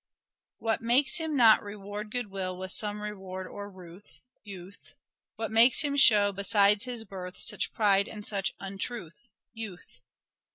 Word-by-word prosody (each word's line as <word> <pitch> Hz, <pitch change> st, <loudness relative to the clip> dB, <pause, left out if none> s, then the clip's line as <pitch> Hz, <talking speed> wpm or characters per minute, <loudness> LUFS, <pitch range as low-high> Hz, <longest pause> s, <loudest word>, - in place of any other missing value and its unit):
What 225 Hz, -1 st, -2 dB
makes 260 Hz, +7 st, +3 dB
him 320 Hz, -3 st, -3 dB
not 225 Hz, -3 st, +6 dB
reward 205 Hz, +1 st, -8 dB
good 240 Hz, -3 st, -4 dB
will 185 Hz, -2 st, -3 dB
with 185 Hz, 0 st, -5 dB
some 210 Hz, -1 st, +1 dB
reward 190 Hz, -3 st, -7 dB
or 205 Hz, +2 st, -9 dB
ruth? 185 Hz, 0 st, -14 dB
— -, -, -50 dB
Youth. 185 Hz, +2 st, -13 dB, 0.4 s
What 225 Hz, 0 st, -5 dB
makes 230 Hz, +5 st, +5 dB
him 290 Hz, -2 st, -1 dB
show 210 Hz, -7 st, +5 dB
besides 200 Hz, +1 st, +2 dB
his 245 Hz, -3 st, -4 dB
birth 185 Hz, -3 st, -9 dB
such -, -, -1 dB
pride 200 Hz, -2 st, +2 dB
and 210 Hz, -1 st, -8 dB
such 195 Hz, -2 st, -1 dB
untruth? 195 Hz, -4 st, -7 dB
— -, -, -63 dB
Youth. 175 Hz, -, -11 dB
205 Hz, 160 wpm, -28 LUFS, 190-225 Hz, 0.4 s, not